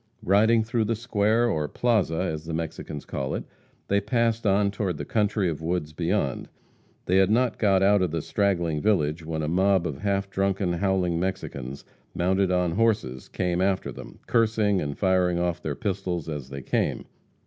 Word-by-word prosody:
Riding 110 +4 +4
through 110 0 0
the 115 +2 0
square, 115 0 +1
or 75 -9 0
plaza, 110 -3 +1
as 80 -4 -3
the 80 -1 -3
Mexicans 80 -2 -5
call 65 0 -3
it, - - -4 0.4
they 100 0 +2
passed 115 +1 0
on 100 +1 +3
toward 100 -5 -2
the - - -5
country 105 -3 +1
of 80 -2 -3
woods 80 -2 -2
beyond. 85 -5 -1 0.6
They 90 - +2
had 95 0 +4
not 120 +1 +1
got 95 -3 +3
out 100 0 +4
of 90 - +1
the 80 -1 -3
straggling 85 -7 0
village, 80 -6 +1
when 80 -1 -3
a - - -1
mob 95 +2 +2
of 75 -5 -4
half 100 -1 0
drunken, 95 -2 0
howling 90 -2 0
Mexicans, 70 -8 -4 0.3
mounted 95 +2 +2
on 90 -1 +1
horses, 100 - 0
came 90 -1 -1
after 95 0 0
them, - - -10
cursing 110 -4 +2
and 70 -1 -4
firing 90 -2 +2
off 85 0 -1
their 75 -4 -3
pistols 95 -6 -3
as 75 -5 -5
they 70 -1 -7
came. - - -1
95 Hz, 180 wpm, -26 LUFS, 80-105 Hz, 0.6 s, Riding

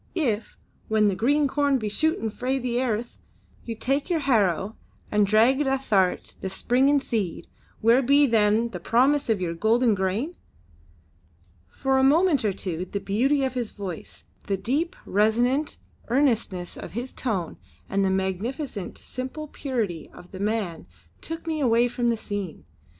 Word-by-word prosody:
If, 235 - -1 0.3
when 215 -1 +3
the 195 - -1
green 285 +7 +2
corn 280 0 +2
be 215 -4 -3
shootin' 225 0 0
frae 255 +4 -1
the 245 -2 -1
airth, 235 -2 -2 0.5
you 230 - -4
take 275 - -1
your 335 -3 +1
harrow 210 - +1 0.4
and 210 -1 +3
drag 230 +7 +4
it 290 - 0
ath'art 215 -9 +1
the 190 - -3
springin' 260 +8 +3
seed, 215 -10 -3 0.3
where 230 +4 +5
be 280 +3 +5
then 225 -1 +3
the 180 - -6
promise 260 +9 +2
of 220 -3 +2
your 175 -2 -2
golden 225 +6 +3
grain?" 200 - -1 1.4
For 265 - 0
a - - +3
moment 305 +1 +4
or 210 - +2
two 180 -2 -4
the 200 - -4
beauty 260 +9 +1
of 260 -1 -1
his 245 -4 -2
voice, 190 -5 -8 0.2
the 195 - 0
deep, 290 - -1
resonant, 240 +8 +1 0.3
earnestness 230 -9 0
of - - -8
his 245 +4 -4
tone 195 -10 -2 0.3
and 195 0 0
the 190 - +2
magnificent, 190 - -3
simple 260 +4 -6
purity 225 - -3
of 180 - -14
the 190 - -8
man 200 - -2 0.3
took 325 +1 -6
me 320 -2 -2
away 240 -3 +3
from 240 0 -1
the 230 - +1
scene. 200 - -5
230 Hz, 160 wpm, -25 LUFS, 200-270 Hz, 1.4 s, where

